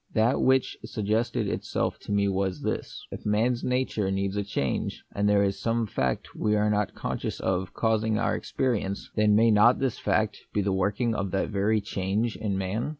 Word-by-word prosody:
That 115 +3 +3
which 130 0 +3
suggested 110 +1 -1
itself - - -2
to - - -8
me 100 0 +2
was 95 -4 -1
this: - - -4
If - - -7
man's 115 +4 +1
nature 125 -6 0
needs 95 0 -1
a 105 - 0
change, 85 -9 -2
and 105 0 +1
there 100 -1 +4
is 100 -1 -1
some 115 0 +1
fact 65 - -2
we 105 0 +1
are 105 0 +2
not 105 -1 0
conscious - - -3
of 95 0 -1
causing 110 -1 +1
our 115 - +1
experience, 105 -7 -2
then 105 -1 +4
may 115 +1 +5
not 105 +4 +6
this 135 -4 -1
fact 105 -2 0 0.2
be 105 - +3
the 100 0 0
working 105 +5 0
of 100 -2 -2
that 95 - 0
very 105 +1 +1
change 100 +3 -1
in 100 -3 -2
man 95 +7 -2
105 Hz, 190 wpm, -27 LUFS, 100-110 Hz, 0.2 s, not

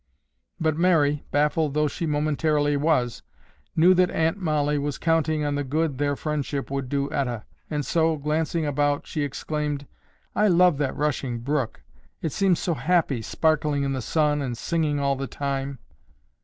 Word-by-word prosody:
But 160 -2 +1
Mary, 155 -5 +3
baffled 150 0 +1
though 150 0 +3
she 165 +3 -3
momentarily 150 0 +1
was, 140 -5 +1 0.5
knew 175 +3 +6
that 180 0 +3
Aunt 160 +3 0
Mollie 150 -4 +1
was 145 0 -2
counting 160 -2 +1
on 145 - 0
the 145 0 -1
good 145 0 -1
their 145 -1 +1
friendship 145 -2 -3
would 135 -2 -3
do 140 0 0
Etta, 125 -6 -2 0.2
and 150 -2 -2
so, 160 -1 +2
glancing 155 +2 -1
about, 145 0 0
she 155 - -3
exclaimed, 145 0 -3 0.5
"I 210 - +4
love 180 -4 +4
that 140 -3 -1
rushing 140 -5 -1
brook! 135 -2 -2 0.4
It 160 - -2
seems 190 +2 +2
so 175 - -1
happy, 160 -6 +1
sparkling 150 +2 +1
in 135 0 0
the 130 - -2
sun 150 +3 +1
and 125 -4 -3
singing 150 +2 0
all 140 -1 +1
the 135 0 -4
time." 140 0 -3
150 Hz, 165 wpm, -25 LUFS, 140-160 Hz, 0.5 s, knew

